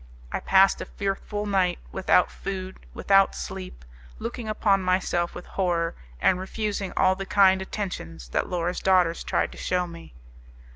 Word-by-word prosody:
I - - -1
passed 195 0 +4
a - - -4
fearful 205 +1 -3
night 190 -3 +1
without - - +3
food, 190 -1 -6 0.2
without 195 -1 +4
sleep, 185 - -7 0.3
looking 220 - -5
upon 205 -2 +2
myself 185 -2 0
with 175 - -8
horror, 170 -3 0 0.3
and 180 - +3
refusing 200 0 -3
all 185 0 +5
the 195 0 -6
kind 190 -1 +5
attentions 85 - -5
that - - -1
Laura's 175 0 -1
daughters 180 -3 +3
tried - - 0
to - - -11
shew 180 0 0
me. 170 - -11
190 Hz, 150 wpm, -26 LUFS, 180-195 Hz, 0.3 s, all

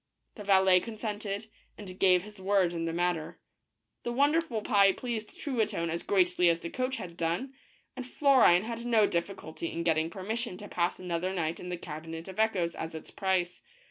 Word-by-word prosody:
The 210 - -9
valet 190 -2 +5
consented, 215 -1 -5 0.3
and 185 -3 -9
gave 185 -2 +5
his 210 -1 -12
word 190 -2 +2
in 165 -1 -2
the 165 - -1
matter. 175 -2 -1 0.6
The 240 - -3
wonderful 285 -3 +1
pie 200 -2 +5
pleased 225 -2 -5
Truitonne 220 - -1
as 170 - -2
greatly 180 -2 +3
as 170 0 +1
the 170 - -6
coach 255 +1 -2
had 180 -7 -7
done, 170 +12 -2 0.4
and 255 -1 -6
Florine 255 -11 +5
had 230 +1 -5
no 230 -3 +4
difficulty 170 -3 -3
in 170 - -3
getting 160 -1 +1
permission 205 +3 -4
to 205 - -9
pass 175 -2 -1
another 180 +1 -2
night 165 -2 -2
in 180 - -7
the 180 - -3
Cabinet 165 +1 -7
of 190 +2 -8
Echoes 185 -6 +1
as 160 0 -6
its 160 - -9
price. 185 -2 -1
190 Hz, 180 wpm, -30 LUFS, 170-220 Hz, 0.6 s, valet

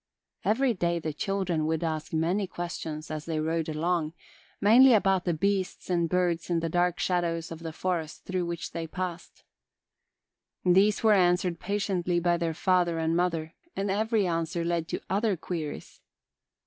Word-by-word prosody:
Every 250 +3 +2
day 170 -3 0
the 160 -2 -3
children 180 -2 -1
would 160 +1 0
ask 155 -2 -3
many 175 +5 0
questions, 160 -3 -5
as 155 -1 -4
they 160 -2 -2
rode 160 +1 -1
along, 160 0 -1 0.5
mainly 240 +4 +7
about 195 -3 +2
the 175 - +1
beasts 190 +1 -1
and 170 -2 +1
birds 175 -1 0
in 170 -1 +2
the 165 0 -2
dark 175 +1 +1
shadows 170 -2 -1
of 165 - -6
the 165 -1 -6
forest 165 -2 -3
through 185 -2 -2
which 170 0 -4
they 165 -1 -4
passed. 180 0 -6 1.2
These 195 +5 +4
were 220 -1 +6
answered 180 -2 +2
patiently 185 -3 0
by 175 0 +2
their 165 -1 -2
father 175 -1 +2
and 160 0 0
mother 165 -2 0 0.2
and 195 0 -1
every 215 +1 +1
answer 165 0 -1
led 170 -1 -1
to - - -4
other 200 0 +1
queries. 160 -3 -6
175 Hz, 160 wpm, -28 LUFS, 165-185 Hz, 1.2 s, mainly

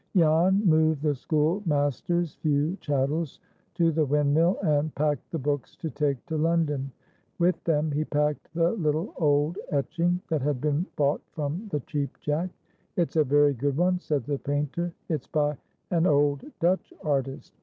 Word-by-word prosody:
Jan 175 +5 +4
moved 155 -3 +3
the 150 -2 +2
schoolmaster's 155 +1 0
few 150 +3 0
chattels 145 +2 -1 0.4
to 165 -1 +3
the 160 0 +2
windmill, 150 +5 +2
and 150 -2 +1
packed 150 -2 -1
the 165 - -3
books 145 -1 -2
to 160 - -5
take 140 -2 -1
to 160 -2 -3
London. 155 -4 +1 0.5
With 175 +1 +1
them 155 -2 +1
he 150 +2 0
packed 150 -1 -1
the 170 0 +3
little 160 -4 -1
old 150 +1 +1
etching 170 +4 0
that 160 -4 0
had 140 -1 0
been 150 +6 0
bought 145 0 +1
from 155 +8 -3
the 150 -6 -2
Cheap 140 +1 -4
Jack. 155 +5 -1 0.5
"It's 170 -2 0
a 155 - +5
very 145 +1 +4
good 140 +2 -1
one," 180 +1 +2
said 150 -7 -1
the 140 +2 -2
painter. 145 +5 -2 0.2
"It's 155 -5 -2
by 150 -2 +1 0.4
an 170 0 +3
old 145 -2 +2
Dutch 180 +3 +1
artist. 135 -3 -2
150 Hz, 160 wpm, -27 LUFS, 145-165 Hz, 0.5 s, a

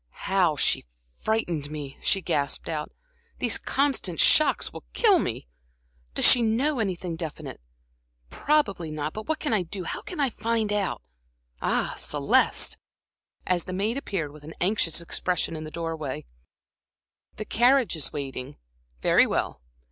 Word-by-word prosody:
"How 185 -5 +3
she 135 - +1 0.3
frightened 175 -10 0
me!" 145 -3 -7
she 195 -2 +1
gasped 140 -2 0
out. 155 -2 -3 0.5
"These - - 0
constant 265 - 0
shocks 310 - +4
will - - -8
kill 415 -6 +5
me. 110 - -3 0.7
Does - - +3
she 245 - +8
know 245 +5 +2
anything 185 -5 -2
definite? 155 - -6 0.7
Probably 205 - +1
not. 155 0 -3
But 215 0 -6
what 315 - 0
can 295 - -1
I 210 - +3
do, 180 +2 -5
how - - -4
can 365 -6 -7
I 275 -3 +2
find 220 -1 0
out? 200 -3 -1 0.6
Ah, - - 0
Celeste!" - - +2 0.7
as 180 -2 +1
the 185 - -5
maid 205 +5 0
appeared 190 - -3
with 150 0 -14
an 160 +2 -9
anxious 175 -4 +1
expression 170 0 -1
in 155 0 -5
the - - -6
door 165 0 -3
way. 140 - -5 1.1
"The 215 - -5
carriage 245 -1 +3
is 155 - -3
waiting? 140 -1 -5 0.5
Very - - +5
well." - - -2
180 Hz, 150 wpm, -26 LUFS, 155-225 Hz, 1.1 s, she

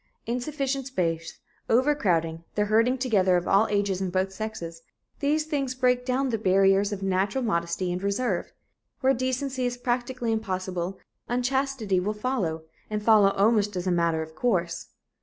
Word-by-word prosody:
Insufficient 270 +2 -2
space, 165 -9 -2 0.3
over 260 +6 +4
crowding, 165 - 0
the 210 - +2
herding 230 +5 +3
together 200 -8 +3
of 175 - -3
all 200 +3 +4
ages 200 -2 0
and 185 -2 -1
both 190 +1 0
sexes 175 -6 -6 0.4
these 300 +2 +1
things 275 -5 -2
break 250 -1 +2
down 260 +1 +1
the 225 -3 -1
barriers 195 +1 +3
of 200 -1 -4
a - - -1
natural 195 +7 0
modesty 175 -3 -1
and 180 - -3
reserve. 200 0 -1 0.5
Where 265 +1 +4
decency 260 +1 -2
is 245 0 -1
practically 245 -1 -1
impossible, 185 -4 -2 0.3
unchastity 250 -5 0
will 210 +4 -2
follow, 210 -9 -2 0.3
and 210 -1 -3
follow 210 -3 +6
almost 205 0 +2
as 180 0 -3
a 185 - +1
matter 170 -2 +1
of 160 0 -11
course." 170 -3 -1
210 Hz, 160 wpm, -26 LUFS, 185-250 Hz, 0.5 s, follow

